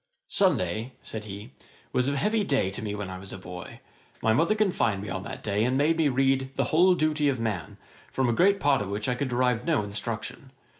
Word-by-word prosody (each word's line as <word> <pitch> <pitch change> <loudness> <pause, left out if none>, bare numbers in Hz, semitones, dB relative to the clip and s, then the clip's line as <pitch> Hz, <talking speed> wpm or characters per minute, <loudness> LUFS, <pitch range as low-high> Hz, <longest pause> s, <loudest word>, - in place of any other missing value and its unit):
'Sunday 115 - +1
(said 110 -1 -6
he) 105 +4 -8 0.4
was 125 +1 +2
a 140 - -1
heavy 210 +9 +1
day 135 - +1
to 105 - -5
me 105 -1 -3
when 105 -2 -4
I 95 0 -6
was 95 0 -9
a - - -6
boy. 90 -1 -9 0.4
My 110 - +4
mother 165 - +3
confined 150 - +1
me 105 - -6
on 95 - -3
that - - -7
day, 105 0 +1
and 125 +2 +1
made 155 +4 +3
me 160 -3 +3
read 135 0 +2
"The - - +1
Whole 180 +3 +6
Duty 155 -2 +2
of 130 -3 -1
Man," 105 -9 -3 0.3
from 130 -1 +1
a 120 - +2
great 195 - +4
part 140 -3 +3
of 100 - -4
which 105 +1 -2
I 125 - +2
could 130 +2 -2
derive 125 -1 +1
no 160 -10 +1
instruction. 115 +6 -5
125 Hz, 230 wpm, -27 LUFS, 105-145 Hz, 0.4 s, Whole